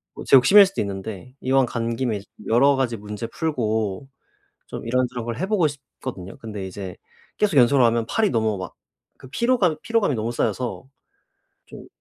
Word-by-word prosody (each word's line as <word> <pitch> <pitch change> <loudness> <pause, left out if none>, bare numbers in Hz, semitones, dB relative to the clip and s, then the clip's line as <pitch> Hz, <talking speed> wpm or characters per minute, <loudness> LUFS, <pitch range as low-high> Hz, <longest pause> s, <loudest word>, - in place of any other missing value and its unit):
뭐 - - -7
제 - - +6
욕심일 195 +11 +8
수도 195 - -6
있는데 100 +4 -6
이왕 135 0 +3
간 115 -1 -3
김에 115 -3 -1
이제 100 - -11 0.2
여러 135 +5 +4
가지 130 -3 -1
문제 105 +2 -6
풀고 110 - -2 0.6
좀 - - -7
이런저런 125 0 -1
걸 115 0 -4
해 190 - -1
보고 195 -5 +2
싶거든요. 130 -8 -9
근데 105 -4 -7
이제 95 -1 -7 0.4
계속 200 -8 +1
연속으로 125 0 +5
하면 115 0 +1
팔이 220 -2 +1
너무 110 -4 0
막 90 -4 -7 0.5
그 - - -12
피로감, 210 - +1
피로감이 225 -10 +1
너무 115 0 -2
쌓여서 125 +2 -2 0.8
좀 - - -12
120 Hz, 345 characters per minute, -23 LUFS, 110-140 Hz, 0.8 s, 욕심일